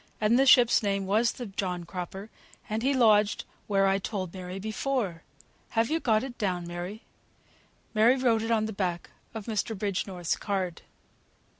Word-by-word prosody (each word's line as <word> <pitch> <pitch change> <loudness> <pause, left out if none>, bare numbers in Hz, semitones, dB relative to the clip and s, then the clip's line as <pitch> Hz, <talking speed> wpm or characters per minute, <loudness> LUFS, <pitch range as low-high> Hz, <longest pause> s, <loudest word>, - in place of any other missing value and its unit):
"And 215 +4 +3
the 270 - +4
ship's 245 -2 +6
name 200 -2 0
was 220 +4 +2
the 245 - -6
John 185 -3 -3
Cropper, 185 +4 -7 0.4
and 215 +1 -2
he 265 +3 +2
lodged 215 -5 +3 0.2
where 195 -1 +3
I 195 0 +2
told 190 -3 -4
Mary 185 0 -6
before. 215 -3 -2 0.6
Have 230 +5 +2
you 325 - +2
got 220 -6 +2
it 260 -2 -7
down, 180 -5 -1
Mary?" 175 +5 -6 0.9
Mary 225 +3 +5
wrote 235 -4 +2
it 225 - -3
on 220 -2 +2
the 220 - -4
back 180 -3 -3 0.2
of 220 -2 -5
Mr. 220 -1 -2
Bridgenorth's 185 -3 -2
card. 190 -4 -3
210 Hz, 165 wpm, -28 LUFS, 185-225 Hz, 0.9 s, ship's